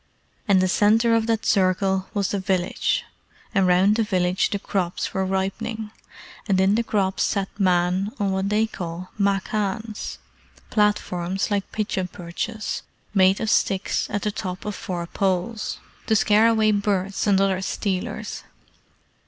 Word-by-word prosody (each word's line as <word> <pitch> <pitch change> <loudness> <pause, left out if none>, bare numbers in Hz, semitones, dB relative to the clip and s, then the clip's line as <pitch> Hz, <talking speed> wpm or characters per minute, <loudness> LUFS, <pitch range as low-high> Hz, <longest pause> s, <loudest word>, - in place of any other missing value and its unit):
And 195 -3 +5
the 185 - +3
centre 215 +5 +3
of 225 0 +2
that 225 -1 0
circle 190 -1 +2
was 200 -1 +1
the 200 - -1
village, 185 -2 0 0.5
and 195 -4 +3
round 190 +4 +4
the 225 - +3
village 185 -2 +1
the 200 - -1
crops 185 -3 -2
were 190 - 0
ripening, 210 +3 -2 0.6
and 190 -1 +3
in 190 +1 +4
the 225 - +2
crops 195 -4 0
sat 195 -2 0
men 180 +1 +2
on 200 -1 +1
what 190 +1 -1
they 215 +2 +3
call 180 -3 -6
machans 205 +2 -1 0.5
platforms 195 -3 0
like 200 -1 -1
pigeon 200 -3 -2
perches, 180 +6 -4 0.3
made 190 -1 +4
of 220 -2 0
sticks 195 0 +1
at 205 -1 -2
the 210 - 0
top 185 -2 -5
of 210 - -2
four 175 -3 -4
poles 190 +4 -1 0.3
to 220 - +3
scare 215 +1 +5
away 220 -1 +3
birds 200 -1 0
and 195 -2 +4
other 195 -1 +1
stealers. 190 -1 -3
195 Hz, 150 wpm, -23 LUFS, 185-210 Hz, 0.6 s, And